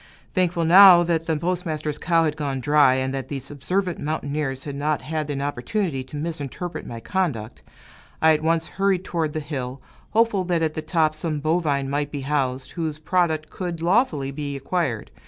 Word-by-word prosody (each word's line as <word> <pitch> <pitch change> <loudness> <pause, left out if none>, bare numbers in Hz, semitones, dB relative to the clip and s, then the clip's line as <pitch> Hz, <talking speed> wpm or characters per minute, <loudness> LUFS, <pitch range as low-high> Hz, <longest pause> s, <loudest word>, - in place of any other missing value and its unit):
Thankful, 175 -2 +1
now, 180 0 +9
that 165 -1 -1
the 160 -2 +1
postmaster's 160 -3 -2
cow 165 -2 +2
had 155 -2 0
gone 140 -3 -2
dry, 145 -1 +4
and 130 0 -1
that 135 -2 -4
these 135 -1 -5
observant 180 +6 -2
mountaineers 145 -3 -3
had 145 -2 -6
not 150 +1 -1
had 155 -1 -3
an 140 -1 -2
opportunity 145 - -2
to 145 - -8
misinterpret 160 +2 -5
my 115 - -6
conduct, 125 - -2 0.6
I 160 0 +5
at 155 - 0
once 165 0 +1
hurried 195 0 0
toward 160 -3 -1
the 155 - -2
hill, 135 -3 -5 0.3
hopeful 225 -3 +2
that 170 -2 +1
at 155 -1 0
the 155 - -3
top 155 -1 +1
some 155 -1 -3
bovine 150 -3 0
might 145 +1 -2
be 145 - -4
housed, 135 -2 -1
whose 160 -3 -3
product 160 -1 0
could 175 -3 -4
lawfully 170 - +1
be 140 0 -4
acquired. 135 - -2
155 Hz, 180 wpm, -23 LUFS, 140-170 Hz, 0.6 s, now